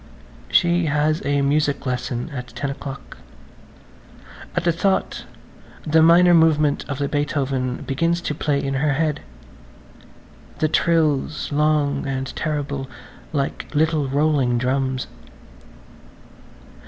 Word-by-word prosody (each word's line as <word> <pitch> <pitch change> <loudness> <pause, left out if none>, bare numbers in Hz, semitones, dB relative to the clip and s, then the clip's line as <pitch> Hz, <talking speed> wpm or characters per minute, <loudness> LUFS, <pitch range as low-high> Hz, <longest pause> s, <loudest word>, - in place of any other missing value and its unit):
[Page - - +5
138] 175 0 +1
She - - -1
has 150 +2 +1
a 140 0 +2
music 145 0 +1
lesson 125 +2 -3
at 125 -2 -5
ten 140 +2 -4
o'clock. 140 0 -9 1.4
At 175 - 0
the 170 - +3
thought 190 +4 -1 0.6
the 160 +1 +4
minor 175 +2 +6
movement 155 -3 +3
of 140 - -3
the 140 0 -1
Beethoven 135 -4 -2
begins 165 +5 0
to 155 - -2
play 150 -1 0
in 135 0 -2
her 145 +2 +1
head, 150 0 0 1.4
the 155 - +1
trills 155 -3 +1
long 145 -1 +1
and 135 -1 -4
terrible 140 -3 -3 0.4
like 140 -3 -2
little 155 -1 +2
rolling 140 -3 +1
drums. 130 +1 -1
145 Hz, 120 wpm, -21 LUFS, 135-155 Hz, 1.4 s, minor